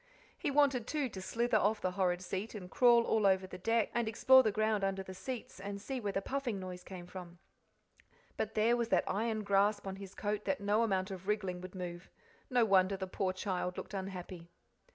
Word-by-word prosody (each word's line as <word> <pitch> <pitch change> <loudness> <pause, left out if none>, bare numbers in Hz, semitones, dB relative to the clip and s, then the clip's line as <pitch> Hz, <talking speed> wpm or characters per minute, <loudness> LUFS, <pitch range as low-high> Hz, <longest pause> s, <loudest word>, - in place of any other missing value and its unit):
He - - -2
wanted, 275 -4 +3
too, 290 -4 -1
to 190 -4 -7
slither 230 +3 +1
off 210 +2 +2
the 185 - -1
horrid 180 -1 0
seat, 195 +5 -4
and 180 -3 -8
crawl 240 -2 +6
all 220 -3 +2
over 190 -1 +3
the 185 -1 -9
deck, 225 +3 +1
and 235 -1 0
explore 260 +4 +6
the 220 - +1
ground 215 -1 +1
under 195 0 -1
the 190 - -8
seats, 240 +1 -6
and 200 +1 -5
see 265 +5 -4
where 205 -4 -2
the 195 0 -2
puffing 260 -6 -2
noise 180 -1 -7
came 180 -2 -9
from; 180 -1 -9 1.0
but 220 0 -3
there 225 +2 +4
was 235 -1 0
that - - +3
iron 215 +2 -1
grasp 200 +1 +2
on 190 0 -5
his 195 -1 -10
coat 210 0 -2
that 285 - 0
no 205 +2 +2
amount 195 -3 0
of 190 0 -8
wriggling 190 -4 -1
would 185 +1 -9
move. 175 -1 -6 0.4
No 245 -3 +4
wonder 195 -1 +4
the 190 - -3
poor 185 0 -1
child 185 -1 -3
looked - - -7
unhappy! 185 -3 -6
200 Hz, 215 wpm, -33 LUFS, 185-225 Hz, 1.0 s, crawl